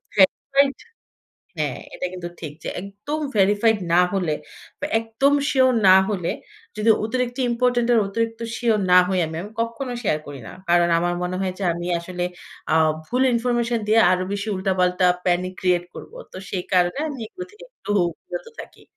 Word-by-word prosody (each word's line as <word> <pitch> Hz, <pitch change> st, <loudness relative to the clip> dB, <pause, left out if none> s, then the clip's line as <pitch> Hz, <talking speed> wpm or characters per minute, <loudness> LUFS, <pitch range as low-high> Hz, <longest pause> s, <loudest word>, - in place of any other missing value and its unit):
হ্যাঁ, 190 Hz, -2 st, +7 dB, 0.3 s
রাইট 275 Hz, 0 st, +3 dB, 0.8 s
হ্যাঁ, -, -, -2 dB, 0.2 s
এটা 180 Hz, -, -3 dB
কিন্তু 175 Hz, -1 st, -6 dB
ঠিক 155 Hz, -3 st, -6 dB
যে -, -, -5 dB
একদম 205 Hz, +11 st, -5 dB, 0.2 s
verified 205 Hz, +2 st, +3 dB
না 175 Hz, -, +6 dB
হলে 175 Hz, -6 st, 0 dB, 0.5 s
বা, 295 Hz, -, -1 dB
একদম 230 Hz, +5 st, +1 dB, 0.2 s
সিউর 260 Hz, -1 st, +4 dB, 0.2 s
না 185 Hz, -, +9 dB
হলে, 185 Hz, -5 st, -1 dB, 0.5 s
যদি 215 Hz, +2 st, +2 dB
অতিরিক্ত 250 Hz, +2 st, -2 dB
ইম্পোর্টেন্ট 240 Hz, 0 st, +1 dB
আর, 230 Hz, -, +5 dB
অতিরিক্ত 225 Hz, +2 st, -2 dB, 0.2 s
সিউর 230 Hz, -3 st, +1 dB
না 180 Hz, -, +9 dB
হই 190 Hz, -1 st, 0 dB
আমি, 160 Hz, 0 st, -6 dB
আমি 205 Hz, -, -9 dB
কক্ষনো 235 Hz, +3 st, -3 dB
শেয়ার 155 Hz, -7 st, +1 dB
করি 140 Hz, -2 st, -8 dB
না। -, -, -9 dB, 0.2 s
কারণ 175 Hz, 0 st, +4 dB
আমার 175 Hz, +1 st, 0 dB
মনে 180 Hz, +1 st, -2 dB
হয় 185 Hz, -1 st, -1 dB
যে 195 Hz, -, -3 dB
আমি 175 Hz, +1 st, -5 dB
আসলে 175 Hz, +1 st, -4 dB, 0.4 s
অ্যা 160 Hz, -, +3 dB, 0.3 s
ভুল 250 Hz, +1 st, 0 dB
ইনফরমেশন 235 Hz, -1 st, 0 dB
দিয়ে 220 Hz, +1 st, +5 dB
আরো 185 Hz, 0 st, +2 dB
বেশি 205 Hz, +2 st, -3 dB
উল্টাপাল্টা 185 Hz, -1 st, +1 dB, 0.2 s
panic 180 Hz, +1 st, +1 dB
create 180 Hz, -1 st, +1 dB
করবো। -, -, -10 dB, 0.2 s
তো -, -, -10 dB
সেই 180 Hz, -2 st, -3 dB
কারণে 180 Hz, +6 st, +2 dB
আমি 280 Hz, -3 st, -6 dB
এগুলো 365 Hz, +10 st, -8 dB
থেকে 425 Hz, +4 st, -14 dB
একটু 205 Hz, -, -10 dB, 0.4 s
বিরত -, -, -6 dB
থাকি। -, -, -13 dB
205 Hz, 175 wpm, -22 LUFS, 180-240 Hz, 0.8 s, না